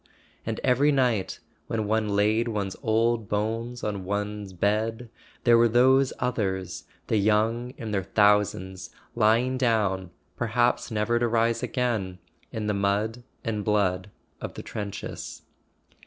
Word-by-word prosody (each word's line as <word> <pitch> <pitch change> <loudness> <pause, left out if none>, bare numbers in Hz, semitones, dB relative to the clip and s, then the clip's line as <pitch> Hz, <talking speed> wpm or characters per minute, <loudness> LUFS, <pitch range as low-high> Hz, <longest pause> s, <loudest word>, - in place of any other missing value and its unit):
And 110 -1 -2
every 135 +3 +4
night, 120 -9 +1 0.3
when 110 -2 -1
one 110 0 0
laid 110 +3 +2
one's 100 -4 -2
old 115 -1 +1
bones 115 +4 -2
on 100 -3 -2
one's 105 +1 -3
bed, 110 +5 -1 0.3
there 120 -1 +6
were 120 - +6
those 130 +3 +4
others, 95 -7 -2 0.2
the 110 - +1
young 110 +4 +1
in 110 -2 -5
their 100 -2 +1
thou¬ 105 -1 +6
sands, 95 -1 -8 0.2
lying 120 +3 +2
down, 100 -7 +1 0.3
perhaps 120 +1 +1
never 115 +1 +1
to 120 - +2
rise 115 0 +1
again, 115 -7 -1 0.3
in 110 -1 -4
the 105 - 0
mud 100 +4 0 0.2
and 105 -3 -2
blood 100 -3 +1 0.3
of - - -6
the - - -7
trenches. 100 -2 -6
110 Hz, 140 wpm, -26 LUFS, 105-120 Hz, 0.3 s, there